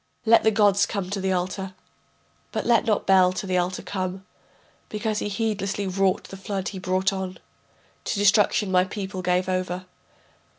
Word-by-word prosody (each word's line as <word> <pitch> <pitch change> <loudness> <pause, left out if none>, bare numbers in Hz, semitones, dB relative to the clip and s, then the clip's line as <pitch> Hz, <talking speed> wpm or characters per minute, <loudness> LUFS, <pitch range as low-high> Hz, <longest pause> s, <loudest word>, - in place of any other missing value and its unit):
Let 230 +1 +6
the 220 - +4
gods 205 -2 +3
come 195 -3 -4
to 200 -1 -2
the 190 0 0
altar, 185 +1 -2 0.8
But - - -3
let 235 -1 +3
not 215 -2 +1
Bel 185 -1 +5
to 190 - -4
the 185 -1 +1
altar 180 +1 -2
come, 185 0 -4 0.6
Because 215 0 -2
he - - -2
heedlessly 205 -2 -2
wrought, 190 0 +1
the 195 - -10
flood 195 -1 -3
he 195 - -7
brought 185 +1 0
on, 190 -1 -4 0.7
To - - -1
destruction 205 0 +3
my 180 -1 +5
people 190 0 -5
gave 180 0 +1
over. 185 0 -2
190 Hz, 170 wpm, -24 LUFS, 185-205 Hz, 0.8 s, Let